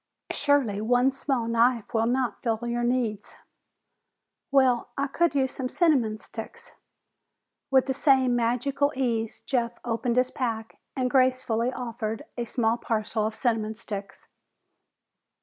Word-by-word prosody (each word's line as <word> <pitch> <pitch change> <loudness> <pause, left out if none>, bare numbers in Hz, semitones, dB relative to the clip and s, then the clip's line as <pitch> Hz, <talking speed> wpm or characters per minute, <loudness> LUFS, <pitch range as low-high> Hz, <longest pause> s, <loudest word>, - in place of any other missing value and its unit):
"Surely 260 -9 +1
one 245 +4 +3
small 270 -3 -1
knife 235 0 +2
will 225 0 +2
not 250 0 0
fill 225 -3 0
your 240 0 -1
needs?" 240 -4 -1 1.1
"Well, 260 -3 +3
I 280 - +1
could 330 +3 +1
use 265 -2 +2
some 255 -1 -3
cinnamon 265 -11 +2
sticks." 350 - -9 1.0
With 265 -1 +4
the 265 - -1
same 260 -3 +3
magical 250 +5 +1
ease, 230 -4 -2
Jeff 240 -3 0
opened 235 +1 -1
his 255 0 +3
pack 225 -4 -4 0.2
and 255 -1 0
gracefully 255 -2 +2
offered 235 -1 -4
a 240 - -3
small 230 0 +1
parcel 215 -2 -1
of 220 - -6
cinnamon 220 -2 0
sticks. 200 -3 -8
245 Hz, 130 wpm, -26 LUFS, 225-265 Hz, 1.1 s, With